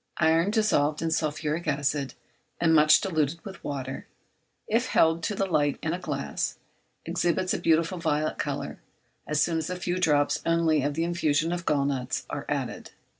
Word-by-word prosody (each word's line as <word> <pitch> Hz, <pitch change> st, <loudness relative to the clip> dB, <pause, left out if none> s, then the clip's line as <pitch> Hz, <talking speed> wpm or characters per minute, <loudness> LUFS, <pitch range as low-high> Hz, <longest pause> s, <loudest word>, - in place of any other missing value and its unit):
Iron 165 Hz, +3 st, +3 dB
dissolved 165 Hz, -9 st, +1 dB
in 165 Hz, -, 0 dB
sulphuric 155 Hz, +1 st, -1 dB
acid, 140 Hz, -1 st, -1 dB, 0.4 s
and 165 Hz, -1 st, +3 dB
much 155 Hz, -1 st, +6 dB
diluted 160 Hz, -3 st, -1 dB
with 195 Hz, -2 st, -9 dB
water, 135 Hz, -2 st, -5 dB, 0.6 s
if 235 Hz, +3 st, +1 dB
held 165 Hz, +1 st, +3 dB
to 205 Hz, -, -2 dB
the 195 Hz, -, 0 dB
light 145 Hz, -6 st, +1 dB
in 160 Hz, -, 0 dB
a 175 Hz, -, -3 dB
glass, 145 Hz, -6 st, -3 dB, 0.5 s
exhibits 180 Hz, +2 st, 0 dB
a -, -, -1 dB
beautiful 165 Hz, +2 st, +2 dB
violet 155 Hz, -1 st, -1 dB
colour -, -, -3 dB, 0.5 s
as 150 Hz, 0 st, +2 dB
soon 165 Hz, -1 st, 0 dB
as 160 Hz, -, -4 dB
a 180 Hz, -, -2 dB
few 180 Hz, 0 st, -2 dB
drops 145 Hz, -4 st, +2 dB
only 165 Hz, -2 st, +2 dB
of 145 Hz, +1 st, -1 dB
the 165 Hz, -, 0 dB
infusion 165 Hz, -2 st, +1 dB
of 175 Hz, 0 st, -4 dB
gall 140 Hz, -2 st, +2 dB
nuts 130 Hz, -3 st, -2 dB
are -, -, -5 dB
added. -, -, -3 dB
160 Hz, 175 wpm, -27 LUFS, 145-170 Hz, 0.6 s, much